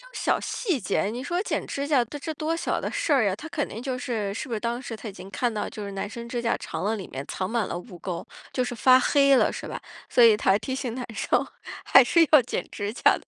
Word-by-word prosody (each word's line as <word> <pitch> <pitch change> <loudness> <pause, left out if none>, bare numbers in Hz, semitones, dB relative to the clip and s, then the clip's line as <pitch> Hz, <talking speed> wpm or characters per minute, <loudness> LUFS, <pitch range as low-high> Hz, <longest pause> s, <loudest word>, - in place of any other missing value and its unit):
种 - - -16
小 - - +1
细 365 - -1
节， 200 - 0
你 235 +4 -3
说 345 +7 -1
剪 - - -2
指 280 +1 -3
甲， 270 -5 +4
这 290 +6 -6
多 315 +2 -1
小 - - -1
的 - - -2
事 310 - -1
儿 235 -7 +4
啊， 185 - 0
他 310 +10 -9
肯 300 -3 -2
定 225 - -7
就 255 -1 -3
是 220 -5 -2
是 205 - -5
不 240 - -3
是 215 - -3
当 235 +1 -2
时 245 -3 -6
他 220 0 -7
已 200 - -7
经 190 0 -10
看 235 +5 -1
到 210 - -3
就 210 - -7
是 200 - -5
男 195 +1 -4
生 235 +2 -8
指 240 0 -2
甲 230 - +1
长 - - -5
了 215 - +1
里 200 -4 -6
面 135 +1 -6
藏 185 +1 -3
满 230 -3 0
了 - - -4
污 180 0 -9
垢， 175 0 -5 0.3
就 255 - 0
是 245 -1 -3
发 255 +2 +6
黑 275 +1 +4
了 - - +4
是 - - -6
吧？ - - -6 0.3
所 245 - +4
以 225 -2 +8
他 200 -1 +3
提 215 +5 -5
醒 260 -3 -3
男 250 0 -4
生， - - +1 0.4
还 - - +7
是 335 -1 +5
要 305 -3 +8
剪 240 - -3
指 205 0 -4
甲 - - -11 0.2
的。 - - -19
235 Hz, 300 characters per minute, -26 LUFS, 210-275 Hz, 0.4 s, 以